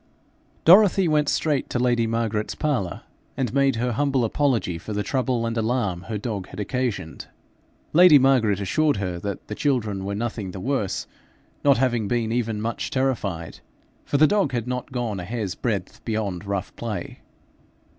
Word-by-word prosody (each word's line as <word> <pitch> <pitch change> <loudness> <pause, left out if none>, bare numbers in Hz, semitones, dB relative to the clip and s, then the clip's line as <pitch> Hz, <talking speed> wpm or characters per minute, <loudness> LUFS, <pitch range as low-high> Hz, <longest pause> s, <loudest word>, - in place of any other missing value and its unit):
Dorothy 190 +1 +7
went 150 -2 +2
straight 150 -4 0
to - - -1
lady 120 -2 +2
Margaret's 110 -2 -1
parlour, 135 - -2 0.3
and 125 -5 -1
made 140 -2 +3
her 120 +2 -1
humble 135 0 +1
apology 115 - 0
for 105 - -6
the 105 0 -1
trouble 125 0 0
and 115 0 -2
alarm 110 -6 0
her 110 - -2
dog 105 -3 -4
had - - -10
occasioned. 105 -6 -3 0.7
Lady 175 -2 +8
Margaret 125 -7 +3
assured 145 +11 +1
her 90 -3 -3
that 100 +1 -5
the - - -5
children 110 -7 -1
were 100 +1 -3
nothing 110 -2 -3
the 95 - -6
worse, 120 -4 -1 0.6
not 140 -2 +5
having 120 -4 +1
been 115 0 0
even 115 -3 -1
much 115 +2 -3
terrified, 105 -11 -2 0.4
for 145 - 0
the 155 - +7
dog 195 -6 +1
had 120 -1 -2
not 125 +2 -4
gone 120 -6 -2
a - - -5
hair's 105 -1 -3
breadth 110 0 -3
beyond 105 -5 -3
rough 100 -2 -3
play. 105 -7 -5
115 Hz, 165 wpm, -24 LUFS, 100-130 Hz, 0.7 s, Lady